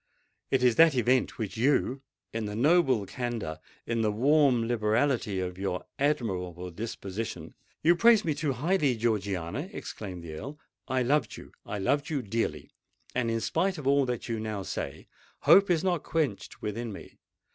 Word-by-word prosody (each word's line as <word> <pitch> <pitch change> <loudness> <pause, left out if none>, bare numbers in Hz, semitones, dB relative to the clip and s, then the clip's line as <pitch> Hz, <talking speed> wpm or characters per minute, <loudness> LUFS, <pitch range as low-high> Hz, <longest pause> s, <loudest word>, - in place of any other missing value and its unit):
It 130 -2 +2
is 125 -2 +4
that 165 -3 +7
event, 125 +1 +2
which 110 -2 -4
you—in 130 -3 -1
the 105 - -5
noble 130 - +3
candour, 115 -8 -4 0.3
in 115 -1 -1
the 110 -1 +2
warm 130 +1 +3
liberality 110 -2 +1
of 90 0 -4
your 95 -2 -2
admirable 90 - -1
disposition——" 105 +1 -5 0.3
"You 170 +3 +6
praise 225 +2 +5
me 155 - +1
too 145 -1 -1
highly, 150 0 +1
Georgiana," 105 - -1
exclaimed 95 - -7
the 80 -2 -7
Earl. 140 - -7 0.3
"I 130 -1 +1
loved 130 -2 +1
you—I 105 - -8
love 140 +9 0
you 145 -5 -1
dearly; 100 -9 -2 0.4
and 120 -2 0
in 115 0 -1
spite 185 +7 0
of 150 - -7
all 140 -1 +3
that 125 -2 -3
you 115 -2 -2
now 110 -2 -3
say, - - -5 0.3
hope 200 0 +6
is 170 -2 +2
not 180 -4 +1
quenched 150 -11 -2
within 115 +2 -3
me. 100 - -11
120 Hz, 160 wpm, -28 LUFS, 105-145 Hz, 0.4 s, that